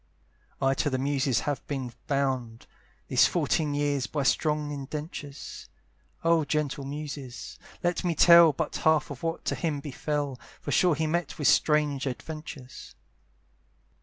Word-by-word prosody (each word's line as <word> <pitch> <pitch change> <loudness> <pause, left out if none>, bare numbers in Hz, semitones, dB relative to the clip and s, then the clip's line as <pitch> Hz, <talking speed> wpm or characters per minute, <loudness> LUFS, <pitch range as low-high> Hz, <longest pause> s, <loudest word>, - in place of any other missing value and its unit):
I 135 0 +3
to 145 - 0
the 130 - -1
muses 135 -1 +1
have 145 -4 -2
been 130 -4 -4
bound, 130 -5 -1 0.4
These - - +5
fourteen 150 -3 0
years, 145 -2 0
by 145 -2 -2
strong 150 +1 +1
indentures; 145 0 -7 0.5
Oh 165 -1 +4
gentle 145 -1 -1
muses! 140 -4 -7 0.2
let 175 +1 0
me 175 -2 0
tell 170 -1 +8
But 155 +2 -3
half 155 -2 +2
of 125 - -8
what 165 0 -3
to - - 0
him 155 -5 -2
befel, 145 -1 -3 0.2
For - - -5
sure 180 -4 +4
he 160 +2 -1
met 165 0 -1
with 150 - +1
strange 150 -3 +2
adventures. 135 0 -7
145 Hz, 140 wpm, -28 LUFS, 135-155 Hz, 0.5 s, tell